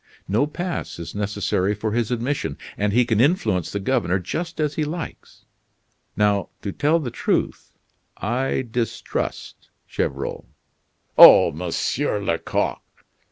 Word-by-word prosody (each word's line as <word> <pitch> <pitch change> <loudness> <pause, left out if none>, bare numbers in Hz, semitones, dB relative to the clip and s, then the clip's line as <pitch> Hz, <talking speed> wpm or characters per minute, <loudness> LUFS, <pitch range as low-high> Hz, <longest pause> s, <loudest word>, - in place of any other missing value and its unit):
No 110 +9 +2
pass 175 +3 -4
is 85 - -7
necessary 105 -1 -1
for 105 +1 -3
his 115 0 0
admission, 125 +5 -2 0.2
and 105 0 0
he 120 +3 +3
can 110 -1 +2
influence 110 - +1
the 100 - -2
governor 100 -4 +1
just 165 - -5
as 150 -1 0
he 155 - -1
likes. 160 +3 -7 0.7
Now, 105 -1 +2
to 100 - -3
tell 150 - +2
the 130 -7 -4
truth, - - -1 0.5
I 130 +4 -1
distrust 115 -1 -4 0.2
Gevrol." - - -3 0.7
"Oh! - - +10
Monsieur 90 - -1
Lecoq!" 85 -5 -1
115 Hz, 125 wpm, -22 LUFS, 100-145 Hz, 0.7 s, Oh